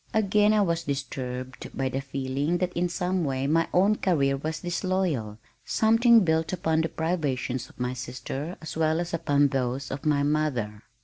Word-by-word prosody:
Again 210 0 +4
I 215 -1 +4
was 170 -2 -1
disturbed 130 -2 -5
by 135 - 0
the 135 +1 -2
feeling 135 +4 -1
that 180 0 -1
in 175 +1 0
some 180 0 -1
way 135 -2 -1
my 165 +3 +2
own 200 +4 +3
career 140 -7 +2
was 155 +3 -4
disloyal, 175 - -1 0.3
something 230 0 +4
built 160 0 +1
upon 160 -3 +1
the 160 - -1
privations 135 -7 -2
of - - -20
my 125 0 -1
sister 130 +6 -5
as 160 - -6
well 160 0 +1
as 175 0 -4
upon 145 -4 +2
those 130 0 -2
of 135 +3 -5
my 150 -2 +2
mother. 140 -9 -1
155 Hz, 175 wpm, -26 LUFS, 135-175 Hz, 0.3 s, Again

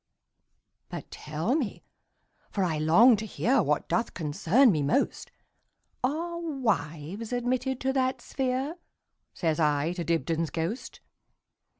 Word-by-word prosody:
"But - - -7
tell 155 +10 -2
me, 265 -10 -2 0.7
for 200 - -1
I 160 -4 0
long 210 +11 +6
to 220 +2 -5
hearWhat 255 +6 +1
doth 230 - -1
concern 175 - +3
me 155 -5 0
most, 145 - 0 0.7
Are 335 +6 -1
wives 220 - -2
admitted 250 +1 -1
to 265 0 +1
that 260 -1 +1
sphere?"Says 260 - -4
I 150 +1 +2
to 175 -1 -3
Dibdin's 165 -1 0
ghost. 170 +9 -4
220 Hz, 110 wpm, -28 LUFS, 160-260 Hz, 0.7 s, long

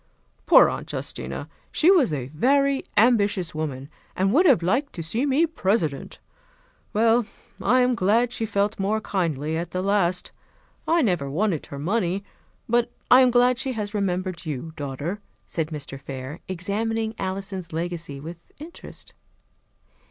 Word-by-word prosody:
Poor - - +8
Aunt - - -4
Justina! - - -5 0.2
She 340 +4 +4
was 320 - +4
a 135 -5 -2
very 275 - +2
ambitious 205 -5 +3
woman, 140 -4 -4 0.3
and 195 +2 +1
would 350 +7 +5
have 245 - +5
liked 250 - 0
to 165 - -5
see 230 - 0
me 285 +5 +3
President. 190 - -1 0.7
Well, 225 +1 +3 0.3
I 255 +1 +4
am 250 0 +3
glad 230 +3 +2
she 225 - -2
felt 205 0 0
more 205 +3 +1
kindly 160 -7 -1
at 170 +1 -3
the 185 +2 -3
last. 190 -3 +1 0.6
I 335 -1 +3
never 175 - 0
wanted 175 +2 -1
her 140 - -7
money; 190 +4 -1 0.4
but 235 +1 +2 0.2
I 250 +1 +9
am 255 - +6
glad 245 0 +3
she 265 -1 -2
has 210 -2 -4
remembered 185 -3 -2
you, 155 0 -5
daughter," 145 +7 -4 0.2
said 160 -2 -2
Mr. 145 -3 -7
Fair, 135 +4 -7
examining 220 +5 -2
Alison's 190 -2 -4
legacy 165 -3 -4
with 165 +4 -8 0.2
interest. 320 +4 -9
195 Hz, 150 wpm, -24 LUFS, 165-235 Hz, 0.7 s, I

